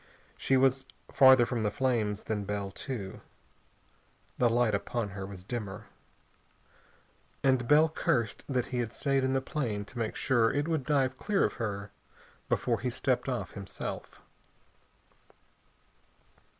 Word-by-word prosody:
She 135 - +2
was 135 0 +2 0.3
farther 130 -2 +7
from 120 -1 -2
the 105 - +1
flames 110 -3 0
than 105 -2 -2
Bell, 100 -1 -3
too. 105 -4 -6 1.2
The 120 - +4
light 120 -1 +2
upon 105 +2 -2
her 95 -1 -6
was 95 -2 -9
dimmer. 105 -1 -6 1.5
And 130 -3 +3
Bell 155 +4 +6
cursed 120 -8 -1
that 125 -3 +1
he 125 - 0
had 115 -2 -2
stayed 135 -2 +1
in 130 0 +1
the 135 - +1
plane 115 -9 -2
to 120 - -9
make 110 -1 -2
sure 115 -3 +2
it 145 +2 -1
would 160 -5 -1
dive 135 -3 +1
clear 200 -1 +1
of - - -1
her 100 -2 -3 0.6
before - - +1
he - - -1
stepped - - 0
off - - -3
himself. - - -7
120 Hz, 140 wpm, -30 LUFS, 105-135 Hz, 1.5 s, farther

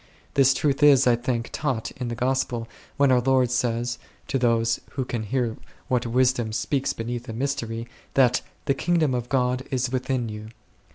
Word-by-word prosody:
This 135 -1 +5
truth 140 0 0
is, 140 -2 +7
I 125 -1 +5
think, 120 0 -2
taught 130 -7 -2
in 125 -2 -5
the 120 - -3
Gospel, 125 -2 -1 0.3
when 140 -2 +4
our 125 -1 +4
Lord 130 -1 +2
says, 120 -1 -1 0.3
to 135 - 0
those 115 -1 +2
who 130 - -2
can 120 -2 -3
hear 115 +1 -1 0.3
what 125 -2 +1
Wisdom 125 -2 +1
speaks 135 +4 0
beneath 120 +2 -5
a - - -4
mystery, 115 -2 -3 0.3
that 125 -2 +4 0.2
"the 140 - +3
Kingdom 160 -1 +1
of 120 -1 -3
God 125 -1 +1
is 130 -1 -1
within 130 -2 -1
you 105 0 -7
2." - - -10
125 Hz, 180 wpm, -25 LUFS, 115-135 Hz, 0.3 s, is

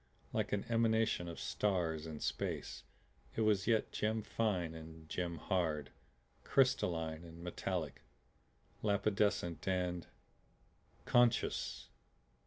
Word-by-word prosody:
Like - - 0
an 105 - 0
emanation 115 -5 +2
of 85 - -6
stars 85 -6 0
and 75 -2 -6
space, - - -2 0.5
it - - 0
was 105 -3 +3
yet 115 -2 +3
gem 110 0 0
fine 105 -6 0
and 80 0 -10
gem 85 0 -2
hard, 75 -7 0 0.5
crystalline 85 - +2
and 85 0 -10
metallic, 85 -5 -3 0.8
lapidescent 100 -4 +1
and 90 -2 0 1.0
Conscious! 120 -1 +2
90 Hz, 100 wpm, -36 LUFS, 80-105 Hz, 1.0 s, was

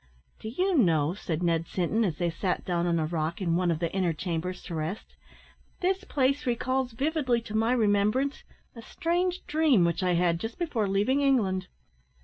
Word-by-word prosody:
"Do 220 - -6
you 370 - 0
know," 165 - +3
said 175 -4 -4
Ned 165 -1 +1
Sinton, 195 +5 0
as 170 -7 -1
they 175 -1 0
sat 180 +2 -2
down 175 -1 0
on 170 -1 +2
a 160 - 0
rock 160 0 -2
in 170 -4 0
one 180 0 +1
of 165 - +1
the 170 0 -3
inner 185 -3 +1
chambers 175 +2 -4
to 175 - -7
rest, 160 +7 -5 0.7
"this 375 +1 0
place 275 -1 0
recalls 250 +1 0
vividly 270 -2 0
to 215 -2 -7
my 225 +3 +2
remembrance 215 +4 +1 0.3
a 230 - -9
strange 350 +8 -1
dream 295 - +3
which 170 +2 0
I 180 -1 +2
had 170 -1 +2
just 225 +6 -5
before 285 - -1
leaving 205 +9 +1
England." 200 -10 +1
200 Hz, 185 wpm, -28 LUFS, 170-260 Hz, 0.7 s, know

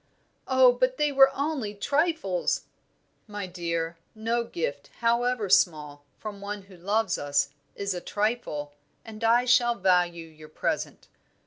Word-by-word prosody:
"Oh, 260 -1 +6
but - - 0
they 295 -1 +2
were 270 -1 +7
only 275 -8 -2
trifles." 285 - 0 0.6
"My 205 -2 -5
dear, 170 -2 -3 0.2
no 230 +2 0
gift, 150 -9 -4
however 235 -1 +1
small, 150 -5 +2
from 205 -2 -8
one 205 0 -5
who 195 -1 -16
loves 205 +6 0
us, 145 -1 +1 0.3
is 200 -1 -2
a 180 - -5
trifle, 205 -10 -2 0.3
and 220 0 -9
I 235 +2 +4
shall 240 -1 +4
value 180 -4 +1
your 155 -1 -15
present. - - -3
205 Hz, 135 wpm, -27 LUFS, 170-240 Hz, 0.6 s, were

